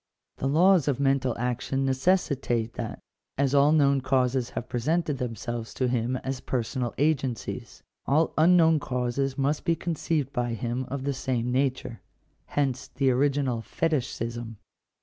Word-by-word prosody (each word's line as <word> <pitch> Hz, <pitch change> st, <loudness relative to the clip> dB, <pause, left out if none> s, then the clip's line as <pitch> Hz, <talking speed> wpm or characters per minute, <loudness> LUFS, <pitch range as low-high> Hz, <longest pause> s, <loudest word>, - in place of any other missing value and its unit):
The 135 Hz, -, -1 dB
laws 170 Hz, +3 st, +4 dB
of 140 Hz, -3 st, +1 dB
mental 135 Hz, -3 st, +1 dB
action 125 Hz, +2 st, -1 dB
necessitate 130 Hz, -5 st, +1 dB
that, 115 Hz, -3 st, -5 dB, 0.4 s
as 140 Hz, 0 st, +1 dB
all 140 Hz, +1 st, +5 dB
known 140 Hz, -3 st, +4 dB
causes 130 Hz, -1 st, +1 dB
have -, -, -5 dB
presented 150 Hz, +4 st, -1 dB
themselves 120 Hz, -1 st, -4 dB
to 130 Hz, -, 0 dB
him 120 Hz, 0 st, 0 dB
as 135 Hz, -1 st, -3 dB
personal 125 Hz, 0 st, -2 dB
agencies, 135 Hz, -5 st, -2 dB, 0.2 s
all 155 Hz, +4 st, +2 dB
unknown 165 Hz, -1 st, +5 dB
causes 130 Hz, +1 st, -2 dB
must 140 Hz, +2 st, 0 dB
be 165 Hz, -, +2 dB
con 170 Hz, +1 st, -3 dB
ceived 150 Hz, -3 st, -1 dB
by 120 Hz, -3 st, -1 dB
him 120 Hz, +4 st, -3 dB
of 135 Hz, 0 st, -4 dB
the 140 Hz, 0 st, -1 dB
same 125 Hz, -2 st, -2 dB
nature. 130 Hz, -3 st, -1 dB, 0.5 s
Hence 135 Hz, -3 st, -1 dB
the 135 Hz, -1 st, +1 dB
original 135 Hz, -2 st, +1 dB
fetishism. 120 Hz, -6 st, -2 dB
130 Hz, 145 wpm, -27 LUFS, 125-145 Hz, 0.5 s, all